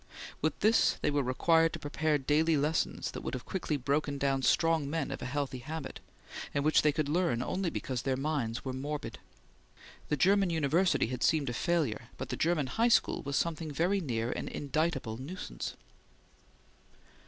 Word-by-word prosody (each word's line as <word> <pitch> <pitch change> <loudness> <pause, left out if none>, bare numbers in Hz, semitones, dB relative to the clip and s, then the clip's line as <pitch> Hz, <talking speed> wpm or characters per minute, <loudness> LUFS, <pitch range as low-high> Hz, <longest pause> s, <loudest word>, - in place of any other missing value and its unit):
With 155 0 -1
this, 220 +2 +4
they - - +2
were 145 0 +2
required 165 +6 +3
to - - -3
prepare 150 +1 0
daily 150 +3 +2
lessons 150 +3 0
that - - -6
would - - -4
have 125 - -7
quickly 165 -5 -2
broken 140 +2 -1
down 135 -1 +1
strong 160 0 +2
men 160 -2 -2
of - - -5
a 125 - -3
healthy 135 -1 -2
habit, 150 +2 -6 0.6
and 140 - +1
which 155 - +5
they 150 - +4
could 150 0 -1
learn 150 -7 +1
only 185 +4 -1
because 130 -6 -3
their 130 -1 -1
minds 135 -5 -2
were 130 - -2
morbid. 140 -3 -5 0.9
The 150 - +1
German 195 +4 +4
university 165 +3 +2
had 125 +2 -5
seemed 145 -6 +2
a - - -5
failure, 140 -7 0
but - - -5
the - - -2
German 160 -3 +1
high 225 - +1
school 235 - +3
was 140 0 -3
something 165 0 -1
very 175 +7 +1
near 120 -6 -2
an - - -4
indictable 145 -6 -1
nuisance. 130 - -6
150 Hz, 175 wpm, -31 LUFS, 135-165 Hz, 0.9 s, which